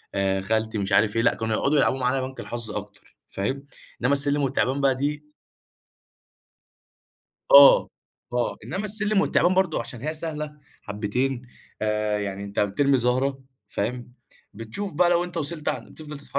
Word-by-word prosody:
آآ 95 -1 0
خالتي، 110 +2 -1
مش 100 0 -3
عارف 105 0 +3
إيه، 115 - +2
لأ، 115 - +2
كانوا 110 -1 -2
يقعُدوا 145 +2 +1
يلعبوا 135 - +2
معانا 130 +1 0
بنك 130 0 -7
الحظ 115 -3 -4
أكتر 105 -1 -9
فاهم، 135 +8 -4 0.3
إنما 130 +3 +2
السلِّم 145 0 +4
التِّعبان 135 +1 0
بقى 135 -1 +3
دي 150 +2 -4 2.2
آه 140 0 +8 0.4
آه، 120 -1 -1
إنما 205 +3 -4
السلِّم 210 -1 +3
والتِّعبان 180 +1 +2
برضه 185 -4 +1
عشان 125 -3 -7
هي 155 +2 -3
سهلة 150 -2 -3 0.2
حبّتين، 120 +5 -2 0.4
آآ 105 -1 0
يعني 100 0 -4
أنت 100 0 -5
بترمي 135 +7 +2
زَهرة 130 +3 0 0.3
فاهم، 125 +2 -4 0.4
بتشوف 115 - -6
بقى 175 +3 +3
لو 175 0 +2
أنت 175 -1 -7
وصَلت 155 0 -1
عن - - -5
بتفضَل 150 -1 -9
تتحرّك، 145 - -12
130 Hz, 155 wpm, -24 LUFS, 110-150 Hz, 2.2 s, آه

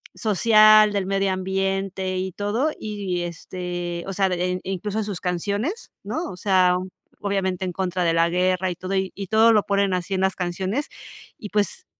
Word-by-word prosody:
social, 215 0 +5
del 200 -2 0
medio 195 0 +1
ambiente 190 0 -2
y 185 +1 -2
todo. 220 - 0
Y, 200 -4 -3
este, 175 0 -5
o 195 - -4
sea, 195 0 +1
de 180 0 -1
en 180 - -3
incluso 195 +3 -3
en - - 0
sus 200 -4 -4
canciones, 205 - -2
¿no?, 330 0 -3
o - - -9
sea, 185 -2 +3 0.4
obviamente 190 -2 -1
en 180 - -2
contra 185 0 -1
de 165 - +2
la 165 0 +3
guerra 185 +1 +1
y - - -5
todo, 185 +2 -5
y 190 +1 -3
todo 220 +1 +5
lo 210 -2 +4
ponen 200 -1 +1
así 180 +2 -3
en 190 - -1
las 190 0 +1
canciones. 190 - -2 0.5
Y, 210 - -8
pues, 205 0 -1
190 Hz, 185 wpm, -23 LUFS, 180-205 Hz, 0.5 s, social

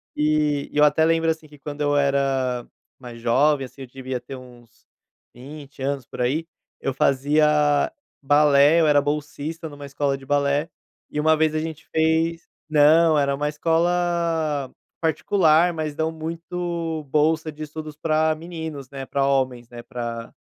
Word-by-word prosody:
e 150 -1 +1
eu 150 - +4
até 155 +2 +4
lembro, 165 0 +2
assim, 160 -1 -3
que 150 -1 -17
quando 145 +1 -7
eu 145 0 +1
era 135 -3 0 0.3
mais 120 -2 -10
jovem, 135 +4 +2
assim, 135 +2 -14
eu 130 - -7
devia 130 0 -5
ter 135 - -9
uns 120 -3 -16 0.5
20 140 +2 -11
anos 135 -2 -2
por - - -7
aí, 155 +7 0 0.3
eu 135 - -1
fazia 145 - +2 0.3
balé, 145 +2 +5
eu 155 - +3
era 145 -1 +5
bolsista 150 +2 -4
numa 145 -1 -10
escola 140 0 -1
de 135 - -14
balé, 145 +3 +1 0.4
e 150 - -3
uma 160 +1 +4
vez 155 0 +2
a - - +1
gente 160 0 -6
fez 160 +1 +1 0.2
não, 155 +1 +5
era 140 -1 +1
uma 145 +1 -2
escola 165 -2 0 0.3
particular, 165 +1 +3
mas 155 -2 -4
dão 160 0 -1
muito 165 0 -4
bolsa 155 +1 +1
de 155 +1 -8
estudos 155 0 -8
pra 155 0 +1
meninos, 160 -4 -7
né, 135 -1 -7
pra 140 0 0
homens, 130 -3 0
né, 120 -1 -10
pra 120 -2 -6
150 Hz, 160 wpm, -23 LUFS, 140-160 Hz, 0.5 s, balé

